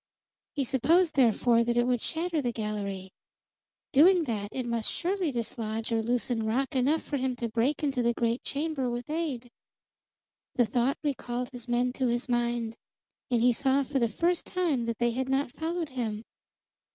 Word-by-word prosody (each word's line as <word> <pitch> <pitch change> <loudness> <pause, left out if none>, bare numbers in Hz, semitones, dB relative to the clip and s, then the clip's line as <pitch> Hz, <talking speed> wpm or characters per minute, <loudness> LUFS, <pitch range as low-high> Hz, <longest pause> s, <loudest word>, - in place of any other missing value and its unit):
He 285 - +1
supposed, 315 +7 +3
therefore, 235 -2 +4
that 240 0 0
it 240 - +4
would 245 -2 +1
shatter 325 -1 -1
the 245 -3 -1
gallery. 200 -4 -4 0.8
Doing 345 +5 +6
that, 210 -7 -3
it 255 -2 -3
must 235 -2 -1
surely 365 -2 -1
dislodge 225 -2 -3
or 225 -1 +2
loosen 240 0 0
rock 255 +5 -1
enough 275 +5 +2
for 285 - -2
him 260 -1 -1
to 240 -1 -3
break 235 +7 0
into 275 -4 +1
the 235 0 +1
great 235 +1 0
chamber 285 -3 -2
with 240 +3 -4
aid. 280 -7 -3 1.0
The 245 - +4
thought 240 +4 +1
recalled 250 -4 -2
his 245 -1 -9
men 245 +1 +1
to 260 -1 0
his 240 +1 -1
mind, 240 -2 -1 0.5
and 240 -2 +2
he 245 0 +5
saw 270 +3 +2
for 270 +1 -1
the 235 -2 +2
first 340 +10 0
time 325 -10 0
that 230 -1 -2
they 240 0 +2
had 260 +2 -2
not 270 -1 +1
followed 325 +2 -3
him. 225 -5 -3
245 Hz, 175 wpm, -28 LUFS, 235-280 Hz, 1.0 s, Doing